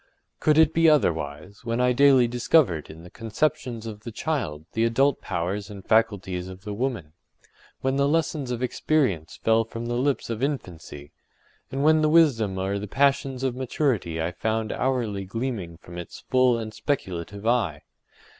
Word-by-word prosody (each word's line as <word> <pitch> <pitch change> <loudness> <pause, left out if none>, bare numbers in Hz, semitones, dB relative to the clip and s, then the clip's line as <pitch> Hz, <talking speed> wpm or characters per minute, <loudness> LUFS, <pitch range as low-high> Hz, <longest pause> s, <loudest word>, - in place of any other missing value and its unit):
Could 155 0 +3
it 160 0 +5
be 165 0 +5
otherwise, 85 - 0
when 115 0 -2
I 125 0 +3
daily 135 -2 +5
discovered 120 - +2
in 80 +2 -11
the 90 - -13
conceptions 115 0 -2
of 110 -2 -7
the 115 +2 -8
child 105 - -3
the 115 - +1
adult 135 +5 +2
powers 100 +4 -3
and 100 -2 -10
faculties 95 -5 +1
of 95 0 -10
the 105 -1 -5
woman?—when 120 - -5
the 140 0 +3
lessons 155 -3 0
of 125 0 -3
experience 125 - 0
fell 115 0 +4
from 115 +1 -7
the 120 - -2
lips 130 0 0
of 115 0 -4
infancy? 90 - -5 0.6
and 135 +1 -2
when 155 +1 +5
the 155 - +3
wisdom 125 - +3
or 95 +2 -1
the 105 - -5
passions 135 +1 +1
of 130 -2 0
maturity 125 - -1
I 80 +2 -1
found 110 +3 -2
hourly 120 -7 -1
gleaming 100 -4 -4
from 85 0 -10
its 85 - -9
full 130 -2 +4
and 110 -1 -5
speculative 100 - -3
eye? 110 -11 +1
115 Hz, 165 wpm, -25 LUFS, 95-135 Hz, 0.6 s, it